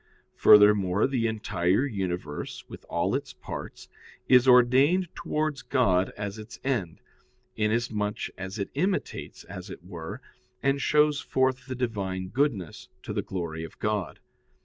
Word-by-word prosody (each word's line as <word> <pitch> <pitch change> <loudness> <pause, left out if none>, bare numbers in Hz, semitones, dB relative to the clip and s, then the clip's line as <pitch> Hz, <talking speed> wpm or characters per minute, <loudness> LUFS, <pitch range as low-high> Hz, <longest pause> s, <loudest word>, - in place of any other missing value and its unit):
Furthermore, 105 -2 +6
the 125 -4 0
entire 105 0 +1
universe, 90 - -4
with - - -11
all - - 0
its - - -3
parts, - - -8 0.4
is 125 0 +6
ordained 130 +9 +5
towards 150 -3 -2
God 95 -10 +2
as 100 +1 -5
its 110 +2 -10
end, 110 -12 -2 0.5
inasmuch 105 -1 -1
as 95 +2 -6
it 100 - -4
imitates, 185 +7 -2
as 95 +1 -9
it 90 - -9
were, 85 -3 -7 0.4
and 140 0 +2
shows 150 -1 +3
forth 130 0 0
the 130 - -4
Divine 100 -7 -3
goodness, 115 - -1
to - - -5
the - - 0
glory 85 -4 -4
of 80 - -10
God. 105 -8 -2
105 Hz, 135 wpm, -27 LUFS, 95-130 Hz, 0.5 s, Furthermore